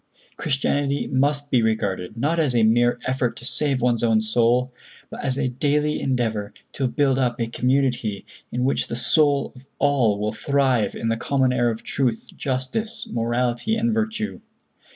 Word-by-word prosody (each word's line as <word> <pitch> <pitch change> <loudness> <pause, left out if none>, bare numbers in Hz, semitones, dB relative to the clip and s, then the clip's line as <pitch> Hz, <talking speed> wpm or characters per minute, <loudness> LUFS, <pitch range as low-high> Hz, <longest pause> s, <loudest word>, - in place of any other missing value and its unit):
Christianity 140 0 0
must 145 +2 0
be 125 - +4
regarded, 105 -3 -1
not 150 +8 0
as 145 -6 +2
a 115 - +4
mere 120 +2 +3
effort 130 -2 0
to 120 - -9
save 135 -2 0
one's 120 -2 +2
own 115 -2 +3
soul, 120 +3 +1 0.4
but - - -7
as 130 -1 +1
a 135 -2 0
daily 150 +4 0
endeavor 110 -6 -1 0.2
to 135 - -1
build 135 0 +1
up 125 -2 0
a 115 - +1
community 120 -4 0 0.3
in 125 +1 -1
which 135 - +1
the - - -4
souls 145 +2 +2
of 130 +1 -15
all 130 -8 +2
will 105 +1 -1
thrive 130 -1 +1
in 115 - -2
the 115 - 0
common 130 +1 +1
air 120 -1 +2
of 115 -1 -5
truth, 125 -5 -2
justice, 135 - -3
morality 120 - 0
and 230 0 +1
virtue. 220 0 -2
125 Hz, 170 wpm, -23 LUFS, 115-140 Hz, 0.4 s, be